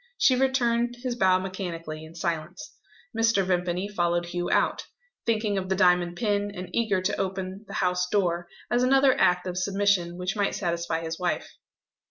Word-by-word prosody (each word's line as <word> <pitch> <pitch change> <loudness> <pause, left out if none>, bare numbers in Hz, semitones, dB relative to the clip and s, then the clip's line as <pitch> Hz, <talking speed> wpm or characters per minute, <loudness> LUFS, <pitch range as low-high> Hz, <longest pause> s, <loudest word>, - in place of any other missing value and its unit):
She 260 - +4
returned 245 -2 +1
his 250 -2 -1
bow 190 -5 +4
mechanically, 170 -4 -5
in 160 +1 -12
silence. 165 -1 -4 0.4
Mr. 225 -4 +3
Vimpany 180 +1 0
followed 175 -3 0
Hugh 175 0 -3
out - - +1 0.4
thinking 215 -3 +1
of 185 0 -6
the 190 - +2
diamond 180 -2 +3
pin, 205 -3 0
and 180 -1 -7
eager 205 -5 +1
to - - 0
open 190 +1 -4
the - - -8
house 180 0 0
door, 175 -4 0 0.2
as 240 +1 +3
another 270 +1 +4
act 180 0 +3
of 180 0 -3
submission 195 -3 +1
which 180 +2 -2
might 205 -1 0
satisfy 170 -3 -2
his 165 +1 -5
wife. 180 -1 -2
185 Hz, 170 wpm, -26 LUFS, 175-210 Hz, 0.4 s, She